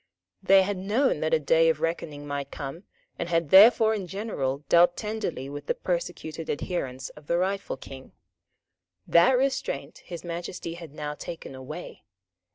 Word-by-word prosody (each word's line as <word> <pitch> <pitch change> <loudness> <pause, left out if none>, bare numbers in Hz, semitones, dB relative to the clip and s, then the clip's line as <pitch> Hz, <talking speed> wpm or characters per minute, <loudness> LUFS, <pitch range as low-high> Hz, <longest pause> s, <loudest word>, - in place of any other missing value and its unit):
They 195 0 +6
had 200 0 -2
known 215 +9 +1
that - - -1
a 485 - +4
day - - +4
of 485 - +1
reckoning 155 -3 -3
might 140 -1 -4
come, 145 +8 -7 0.3
and 170 - -3
had 165 -3 0
therefore 220 +3 +8
in 200 -4 -3
general 150 -9 -3
dealt 175 +1 +5
tenderly 215 - -3
with 145 +1 -8
the - - +1
persecuted 170 -2 -4
adherents 135 -5 -3
of 150 -1 -16
the 170 - +1
rightful 195 -2 -1
King. 130 0 -11 0.9
That 250 +10 +5
restraint 270 +1 -2
His 170 -2 -9
Majesty 170 0 -5
had 165 -4 -10
now 150 -1 -4
taken 160 -1 -8
away. 135 +6 -8
170 Hz, 160 wpm, -27 LUFS, 145-200 Hz, 0.9 s, therefore